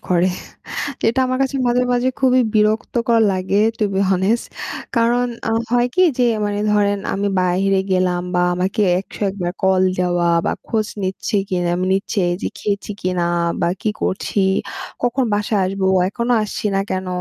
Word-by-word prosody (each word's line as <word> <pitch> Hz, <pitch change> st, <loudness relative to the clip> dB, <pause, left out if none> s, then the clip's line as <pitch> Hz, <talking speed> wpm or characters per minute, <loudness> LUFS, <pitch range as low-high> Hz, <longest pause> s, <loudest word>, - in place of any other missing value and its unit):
করে। 180 Hz, 0 st, +3 dB, 0.8 s
এটা 235 Hz, +4 st, +1 dB
আমার 255 Hz, 0 st, -1 dB
কাছে 270 Hz, 0 st, 0 dB
মাঝে, 245 Hz, +1 st, +2 dB
মাঝে 245 Hz, +1 st, +1 dB
খুবই 255 Hz, -1 st, +4 dB
বিরক্তকর 225 Hz, +2 st, +2 dB
লাগে 190 Hz, +2 st, 0 dB, 0.2 s
টু 215 Hz, -, +2 dB
বি 190 Hz, -, 0 dB
হনেস্ট 195 Hz, +5 st, +1 dB, 0.5 s
কারণ 240 Hz, +2 st, +3 dB, 0.2 s
আ -, -, 0 dB, 0.2 s
হয় 245 Hz, 0 st, +3 dB
কি 370 Hz, -, +4 dB, 0.2 s
যে 250 Hz, -, +3 dB, 0.2 s
মানে 205 Hz, 0 st, -2 dB
ধরেন 205 Hz, -1 st, +2 dB, 0.2 s
আমি 200 Hz, +1 st, -1 dB
বাইরে 185 Hz, +2 st, +2 dB
গেলাম 185 Hz, -1 st, +1 dB
বা 175 Hz, -, +3 dB
আমাকে 190 Hz, +5 st, -1 dB, 0.2 s
১০১ 195 Hz, 0 st, -4 dB
বার 175 Hz, 0 st, -1 dB
কল 190 Hz, -1 st, +3 dB, 0.2 s
দেওয়া 175 Hz, -1 st, +1 dB, 0.2 s
বা -, -, +1 dB, 0.2 s
খোঁজ 215 Hz, -2 st, 0 dB, 0.2 s
নিচ্ছি 190 Hz, +3 st, -2 dB
কিনা, 175 Hz, -2 st, 0 dB, 0.2 s
নিচ্ছে 195 Hz, 0 st, 0 dB, 0.2 s
যে -, -, -1 dB
খেয়েছি 205 Hz, -1 st, -3 dB
কিনা 180 Hz, -1 st, 0 dB, 0.4 s
বা -, -, +2 dB
কি 215 Hz, -, 0 dB
করছি, 190 Hz, +2 st, -1 dB, 0.6 s
কখন 245 Hz, +2 st, +1 dB
বাসায় 210 Hz, 0 st, 0 dB
আসবো 190 Hz, +1 st, -2 dB, 0.2 s
এখনও 235 Hz, +4 st, -1 dB
আসছি। 210 Hz, -, -5 dB
না 195 Hz, -, +2 dB
কেন? 185 Hz, 0 st, -2 dB
200 Hz, 160 wpm, -19 LUFS, 185-235 Hz, 0.8 s, খুবই